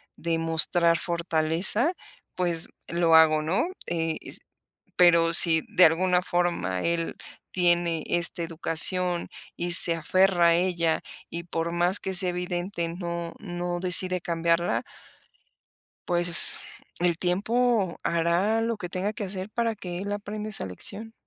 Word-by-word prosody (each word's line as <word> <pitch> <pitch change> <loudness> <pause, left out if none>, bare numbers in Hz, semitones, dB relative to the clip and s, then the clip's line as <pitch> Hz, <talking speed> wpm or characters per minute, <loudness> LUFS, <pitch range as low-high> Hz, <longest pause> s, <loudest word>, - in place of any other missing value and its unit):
de 165 0 -3
mostrar 165 +1 +2
fortaleza, 170 - +2 0.4
pues, 170 -2 0 0.2
lo 170 -1 0
hago, 155 -1 +4
¿no? 180 - -1 0.2
Eh, 165 -1 -3
s - - -8 0.6
pero 170 -2 +4
si 165 -1 +9
de 180 - +4
alguna 180 +2 +1
forma 175 - -2
él 170 0 -2 0.4
tiene 175 -3 0
esta 170 0 -2
educación 170 +2 -3 0.3
y 175 0 -3
se 170 -1 +9
aferra 175 +1 +2
a 165 - +3
ella 170 -2 -1 0.3
y 170 0 -7
por 170 -1 -4
más 175 +3 0
que 190 - -5
sea 185 0 +2
evidente 180 0 -4
no 170 -1 -6
no 175 -2 -5
decide 185 0 +3
cambiarla 170 +1 -1 1.2
pues 175 0 0 0.4
el 175 -1 0
tiempo 205 +2 -1
hará 170 +6 0
lo 230 0 -3
que 180 -4 -8
tenga 185 +4 -3
que 210 - -6
hacer 190 0 -6
para 230 0 -2
que 180 -4 -8
él 200 +3 -6
aprenda 210 +1 -6
esa 210 - -4
lección. 205 - -6
175 Hz, 135 wpm, -25 LUFS, 170-185 Hz, 1.2 s, si